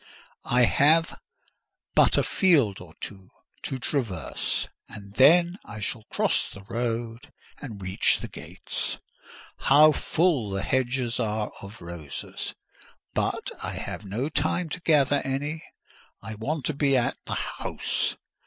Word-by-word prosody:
I 125 Hz, 0 st, +5 dB
have 155 Hz, -, +3 dB, 0.7 s
but -, -, +5 dB
a -, -, +4 dB
field 145 Hz, -, +3 dB
or 80 Hz, -3 st, -13 dB
two 95 Hz, -2 st, -8 dB, 0.3 s
to 135 Hz, -, -3 dB
traverse, 120 Hz, -, -1 dB, 0.2 s
and 100 Hz, -3 st, -10 dB
then 175 Hz, -, +5 dB
I 110 Hz, +1 st, -9 dB
shall 110 Hz, +1 st, -3 dB
cross -, -, +1 dB
the 100 Hz, -, -11 dB
road 115 Hz, +1 st, -3 dB, 0.3 s
and 115 Hz, -8 st, -7 dB
reach 95 Hz, +1 st, +2 dB
the -, -, -5 dB
gates. -, -, -5 dB, 0.6 s
How 150 Hz, +3 st, +7 dB
full 155 Hz, -, +1 dB
the 95 Hz, 0 st, -2 dB
hedges 125 Hz, -2 st, 0 dB
are 110 Hz, -2 st, -1 dB
of 100 Hz, 0 st, -10 dB
roses! 85 Hz, -4 st, -6 dB, 0.6 s
But -, -, -1 dB
I -, -, -4 dB
have -, -, -5 dB
no 105 Hz, +8 st, -2 dB
time 170 Hz, +2 st, 0 dB
to 180 Hz, -, -3 dB
gather 145 Hz, -3 st, +3 dB
any; 145 Hz, +4 st, -2 dB, 0.6 s
I 110 Hz, +1 st, -7 dB
want 135 Hz, +7 st, -3 dB
to 155 Hz, -, 0 dB
be 140 Hz, -1 st, +3 dB
at 120 Hz, -, 0 dB
the -, -, -2 dB
house. -, -, -2 dB
120 Hz, 135 wpm, -26 LUFS, 105-145 Hz, 0.7 s, How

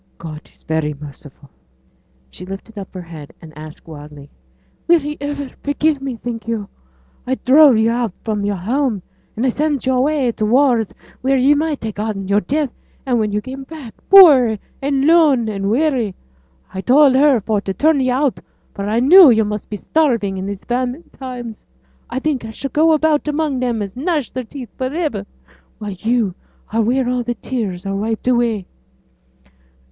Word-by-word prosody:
God 155 Hz, -2 st, -9 dB
is -, -, -21 dB
very 155 Hz, -1 st, -2 dB
merciful.' 140 Hz, -1 st, -13 dB, 0.8 s
She -, -, -10 dB
lifted 195 Hz, +4 st, -9 dB
up 195 Hz, -2 st, -8 dB
her 185 Hz, -2 st, -8 dB
head, 160 Hz, -4 st, -11 dB
and 155 Hz, -3 st, -14 dB
asked 155 Hz, +1 st, -11 dB
wildly, 150 Hz, -2 st, -11 dB, 0.6 s
'Will 345 Hz, 0 st, +6 dB
He 295 Hz, 0 st, -5 dB
iver 285 Hz, -1 st, -4 dB
forgive 290 Hz, 0 st, 0 dB
me, 270 Hz, -2 st, -4 dB
think 230 Hz, -1 st, -6 dB
yo'? 220 Hz, -3 st, -3 dB, 0.6 s
I 260 Hz, -, +1 dB
drove 275 Hz, -1 st, +5 dB
yo' 225 Hz, +1 st, +2 dB
out 240 Hz, -3 st, -1 dB
fra' 220 Hz, -1 st, -1 dB
yo'r 205 Hz, 0 st, -1 dB
home, 225 Hz, +1 st, -1 dB, 0.3 s
and 245 Hz, +2 st, 0 dB
sent 295 Hz, -3 st, -1 dB
yo' 260 Hz, 0 st, +2 dB
away 285 Hz, +1 st, +1 dB
to 220 Hz, -, -4 dB
t' 210 Hz, -, +1 dB
wars, 245 Hz, -4 st, +3 dB, 0.3 s
wheere 270 Hz, +1 st, +2 dB
yo' 270 Hz, +3 st, +4 dB
might 300 Hz, -2 st, -2 dB
ha' 220 Hz, -1 st, -3 dB
getten 205 Hz, -2 st, -4 dB
yo'r 200 Hz, +1 st, +3 dB
death; 285 Hz, -, -1 dB, 0.3 s
and 250 Hz, -3 st, +1 dB
when 210 Hz, -1 st, 0 dB
yo' 210 Hz, +1 st, -1 dB
come 260 Hz, +4 st, -8 dB
back, 275 Hz, -5 st, -10 dB, 0.2 s
poor 280 Hz, -, +8 dB, 0.2 s
and 275 Hz, 0 st, 0 dB
lone, 305 Hz, -8 st, +4 dB
and 200 Hz, -2 st, -2 dB
weary, 245 Hz, -5 st, 0 dB, 0.6 s
I 190 Hz, -, -4 dB
told 275 Hz, +4 st, +5 dB
her 270 Hz, -1 st, +4 dB
for 210 Hz, 0 st, -1 dB
t' 195 Hz, -, -4 dB
turn 305 Hz, +8 st, +2 dB
yo' 255 Hz, -1 st, +1 dB
out, 270 Hz, -, -1 dB, 0.3 s
for 200 Hz, -, -5 dB
a' 210 Hz, -, -2 dB
I 230 Hz, -, +2 dB
knew 340 Hz, +4 st, +9 dB
yo' 220 Hz, -2 st, +4 dB
must 210 Hz, 0 st, -5 dB
be 210 Hz, -, -4 dB
starving 230 Hz, -, 0 dB
in 190 Hz, -, -4 dB
these 200 Hz, -1 st, -6 dB
famine 250 Hz, +5 st, -3 dB
times. 245 Hz, -4 st, -8 dB, 0.5 s
I -, -, -4 dB
think 275 Hz, -2 st, -1 dB
I 225 Hz, -, -7 dB
shall 270 Hz, +5 st, -6 dB
go 320 Hz, +2 st, +4 dB
about 310 Hz, -1 st, +1 dB
among 300 Hz, -3 st, -1 dB
them 240 Hz, -4 st, -1 dB
as 195 Hz, -1 st, -8 dB
gnash 295 Hz, -1 st, -2 dB
their 255 Hz, -1 st, -5 dB
teeth 250 Hz, -2 st, -9 dB
for 260 Hz, -, 0 dB
iver, 280 Hz, -, -3 dB, 0.5 s
while 210 Hz, -2 st, -6 dB
yo' 220 Hz, +1 st, -1 dB, 0.4 s
are 225 Hz, -, +2 dB
wheere 245 Hz, +3 st, +1 dB
all 250 Hz, 0 st, -1 dB
tears 230 Hz, -6 st, -4 dB
are 195 Hz, 0 st, -2 dB
wiped 220 Hz, +4 st, -3 dB
away.' 235 Hz, -5 st, +1 dB
240 Hz, 185 wpm, -18 LUFS, 205-280 Hz, 0.8 s, knew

